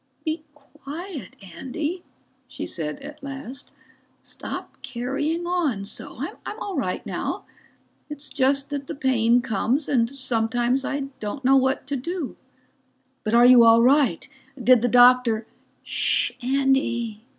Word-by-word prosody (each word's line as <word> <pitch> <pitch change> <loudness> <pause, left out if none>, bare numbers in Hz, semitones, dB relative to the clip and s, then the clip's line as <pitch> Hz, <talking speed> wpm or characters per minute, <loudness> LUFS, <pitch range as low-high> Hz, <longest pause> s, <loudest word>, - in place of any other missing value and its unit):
"Be 315 0 -2
quiet, 295 - -9 0.2
Andy," 310 +7 -4 0.5
she - - -6
said 150 -3 -4
at 295 +2 -10
last. 275 -1 -8 0.5
"Stop - - -8
carrying 285 +8 -2
on 315 - 0
so. 200 - -5 0.3
I'm 425 - -6
all 400 -5 -4
right 225 - -2
now - - -4 0.6
it's 295 0 -6
just 275 +1 +1
that 280 -1 -4
the 320 - -5
pain 245 -4 +3
comes 255 +5 0
and 230 -4 +2
sometimes 245 -1 0
I 280 +1 -2 0.2
don't 220 +6 -5
know 270 +1 +6
what 265 0 +2
to 280 +1 -3
do." 330 +2 -4 0.9
"But 215 +1 0
are 240 +1 +7
you 250 -1 +8
all 230 0 +7
right? 260 - +3 0.3
Did 250 -1 +5
the 245 - +2
doctor 245 -2 +5 0.2
?" - - -40
"Shhh, - - +1
Andy. 245 -4 0
265 Hz, 140 wpm, -24 LUFS, 235-290 Hz, 0.9 s, you